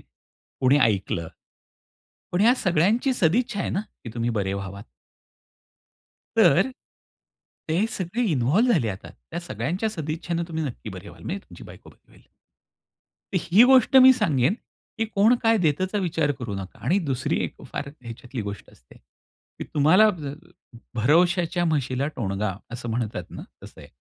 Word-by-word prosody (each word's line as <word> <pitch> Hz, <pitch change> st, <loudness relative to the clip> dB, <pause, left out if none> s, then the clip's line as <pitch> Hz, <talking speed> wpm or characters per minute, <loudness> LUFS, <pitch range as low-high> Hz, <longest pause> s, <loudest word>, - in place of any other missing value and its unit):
कोणी 130 Hz, +2 st, -2 dB
ऐकलं. 95 Hz, -, 0 dB, 1.0 s
पण 175 Hz, -, +1 dB
या 235 Hz, +4 st, +6 dB
सगळ्यांची 205 Hz, -, +2 dB
सदिच्छा 205 Hz, +2 st, +1 dB
आहे -, -, -2 dB
ना, 190 Hz, -, -1 dB, 0.2 s
की 115 Hz, -, -7 dB
तुम्ही 120 Hz, 0 st, -1 dB
बरे 95 Hz, -1 st, -1 dB
व्हावात. 100 Hz, +1 st, -6 dB, 1.5 s
तर, 210 Hz, -, +5 dB, 1.0 s
ते 175 Hz, +8 st, +1 dB
सगळे 190 Hz, +6 st, -2 dB
इन्व्हॉल्व 155 Hz, -, +3 dB
झाले. 140 Hz, -, +1 dB
आता 95 Hz, 0 st, -8 dB
त्या 170 Hz, -, -9 dB
सगळ्यांच्या 170 Hz, -, -3 dB
सदिच्छेनं 165 Hz, 0 st, -3 dB
तुम्ही 160 Hz, -1 st, -3 dB
नक्की 125 Hz, -5 st, -6 dB
बरे 95 Hz, +1 st, -9 dB
व्हाल, -, -, -14 dB
म्हणजे 190 Hz, -, -3 dB
तुमची -, -, -12 dB
बायको -, -, -13 dB
बरी -, -, -27 dB
होईल. -, -, -20 dB, 1.1 s
तर 185 Hz, -, +3 dB
ही 200 Hz, +7 st, +5 dB
गोष्ट 260 Hz, 0 st, +6 dB
मी 260 Hz, 0 st, +9 dB
सांगेन, 160 Hz, -, +1 dB, 0.4 s
की 225 Hz, -, 0 dB
कोण 220 Hz, +2 st, +3 dB
काय 225 Hz, 0 st, +4 dB
देतचा 185 Hz, +3 st, 0 dB
विचार 165 Hz, -5 st, 0 dB
करू 115 Hz, -5 st, -4 dB
नका. 95 Hz, -1 st, -8 dB
आणि 185 Hz, -, +3 dB
दुसरी 130 Hz, -1 st, -1 dB
एक -, -, -6 dB
फार -, -, -4 dB
ह्याच्यातली 120 Hz, +1 st, -7 dB
गोष्ट 100 Hz, -2 st, -7 dB
असते, 60 Hz, -, -21 dB
की -, -, -15 dB
तुम्हाला 180 Hz, +9 st, +5 dB, 0.9 s
"भरवशाच्या 175 Hz, -, +2 dB
म्हशीला 140 Hz, -4 st, 0 dB
टोणगा" 100 Hz, -3 st, -2 dB, 0.2 s
असं 120 Hz, -1 st, -5 dB
म्हणतात 115 Hz, -1 st, -3 dB
ना, -, -, -8 dB, 0.2 s
तसं -, -, -13 dB
आहे. -, -, -13 dB
160 Hz, 145 wpm, -24 LUFS, 120-195 Hz, 1.5 s, मी